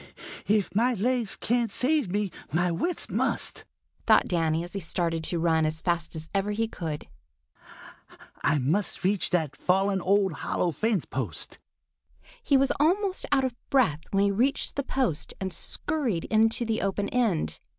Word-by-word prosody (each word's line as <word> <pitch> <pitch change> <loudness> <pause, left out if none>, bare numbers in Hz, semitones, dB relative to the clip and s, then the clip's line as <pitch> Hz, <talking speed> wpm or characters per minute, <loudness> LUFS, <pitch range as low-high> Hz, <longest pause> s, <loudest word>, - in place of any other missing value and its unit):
"If 205 -4 +2
my 240 +5 +2
legs 235 +1 0
can't 235 -1 0
save 275 - +1
me, 205 0 -1 0.2
my 175 +3 +1
wits 340 - -1
must," - - -1 0.4
thought - - +5
Danny 165 -2 +1
as 175 - -9
he 200 - -2
started 165 -2 -1
to 175 - -1
run 165 -1 +2
as 155 +1 -1
fast 170 -2 -1
as 160 0 -5
ever 200 +1 0
he 225 +2 0
could. 160 -8 -5 1.4
"I 145 +2 +3
must 160 +12 0
reach 195 +1 +2
that 160 -5 0
fallen 195 +1 +1
old 195 0 +2
hollow 170 +3 -1
fence 215 +1 0
post." - - -4 0.8
He 280 - +3
was 270 0 +3
almost 375 +5 +1
out 270 -2 +3
of 255 - -2 0.2
breath 230 - +3
when 195 0 +2
he 200 - +3
reached 245 +8 0
the 280 - 0
post 260 - -1
and 190 -2 -3
scurried 240 - -1
into 225 +2 +3
the 225 -1 -1
open 200 +1 -1
end. 180 - 0
195 Hz, 160 wpm, -27 LUFS, 170-240 Hz, 1.4 s, thought